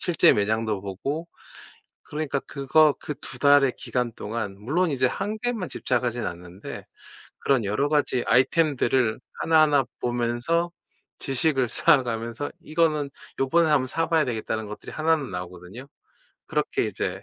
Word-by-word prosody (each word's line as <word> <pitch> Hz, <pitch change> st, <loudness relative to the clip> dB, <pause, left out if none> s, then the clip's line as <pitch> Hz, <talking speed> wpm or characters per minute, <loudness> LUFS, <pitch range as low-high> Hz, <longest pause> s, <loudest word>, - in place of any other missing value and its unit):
실제 170 Hz, -4 st, +4 dB
매장도 110 Hz, 0 st, 0 dB
보고 140 Hz, -, -4 dB, 0.8 s
그러니까 150 Hz, -2 st, -2 dB
그거 145 Hz, +2 st, +3 dB
그 150 Hz, -, -4 dB
2 -, -, -7 dB
달의 140 Hz, -2 st, +5 dB
기간 125 Hz, -2 st, -2 dB
동안 105 Hz, -3 st, -5 dB
물론 160 Hz, -, +1 dB
이제 130 Hz, -2 st, +1 dB
1 205 Hz, +9 st, -3 dB
개에만 235 Hz, -6 st, -2 dB
집착하진 120 Hz, -2 st, -1 dB
않는데 90 Hz, +3 st, -7 dB, 0.5 s
그런 130 Hz, -6 st, +2 dB
여러 120 Hz, +9 st, 0 dB
가지 145 Hz, -4 st, +1 dB
아이템들을 130 Hz, -3 st, +2 dB, 0.2 s
하나하나 155 Hz, -3 st, +4 dB, 0.2 s
보면서 120 Hz, +8 st, 0 dB, 0.5 s
지식을 135 Hz, -2 st, +1 dB
쌓아 135 Hz, +3 st, +4 dB
가면서 115 Hz, +3 st, -4 dB
'이거는 155 Hz, -3 st, +1 dB, 0.3 s
요번에 160 Hz, +5 st, +3 dB
1 150 Hz, -2 st, +5 dB
번 130 Hz, -, -4 dB
사 165 Hz, +5 st, -1 dB
봐야 160 Hz, -2 st, +3 dB
되겠다.'는 110 Hz, -2 st, -2 dB
하는 105 Hz, -, -8 dB
것들이 105 Hz, -, -8 dB
1 160 Hz, +1 st, +3 dB
는 135 Hz, -8 st, -6 dB
나오거든요? 90 Hz, +7 st, -8 dB, 0.6 s
그렇게 -, -, 0 dB
이제 -, -, -3 dB
135 Hz, 315 characters per minute, -25 LUFS, 115-155 Hz, 0.8 s, 달의